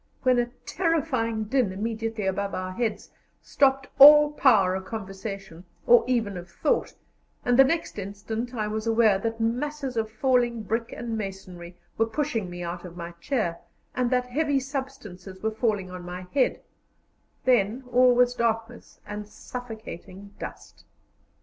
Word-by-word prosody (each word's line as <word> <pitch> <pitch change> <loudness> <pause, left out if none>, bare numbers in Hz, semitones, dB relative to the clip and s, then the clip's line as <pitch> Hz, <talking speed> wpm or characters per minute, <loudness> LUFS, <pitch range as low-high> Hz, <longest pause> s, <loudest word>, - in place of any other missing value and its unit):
when 255 -2 +4
a 240 - +1 0.2
terrifying 275 -11 0
din 235 -2 +1
immediately 225 +1 -3
above 200 +1 -1
our 185 0 -4
heads 220 +3 -3 0.3
stopped 270 -1 +2
all 295 +1 +10
power 215 -11 +4
of 190 0 -3
conversation, 195 -3 -7 0.2
or 240 0 +7
even 225 -6 0
of 175 0 -9
thought, 285 - -1 0.5
and 245 - +3
the - - +11
next 280 -5 -1
instant 215 +5 -5
I 215 -2 -1
was 215 +1 -3
aware 225 -3 +4
that 225 +2 -3
masses 260 +4 -2
of 220 -1 -1
falling 240 0 +1
brick 225 +2 -2
and 230 -2 -4
masonry 185 -4 -7 0.2
were 225 - +3
pushing 225 -6 -2
me 175 0 -6
out 175 0 -5
of 175 -1 -10
my 170 0 -6
chair, 195 -11 -1 0.3
and 250 -1 0
that 250 0 +1
heavy 285 +2 0
substances 240 -9 -7
were 220 - +1
falling 215 -4 -1
on 185 0 -7
my 180 +1 -6
head; 275 -2 +2 0.8
then 245 0 +2
all 250 0 +5
was 245 0 +4
darkness 230 0 -2
and 210 0 -6
suffocating 210 -5 -9
dust. - - -9
225 Hz, 150 wpm, -26 LUFS, 195-250 Hz, 0.8 s, the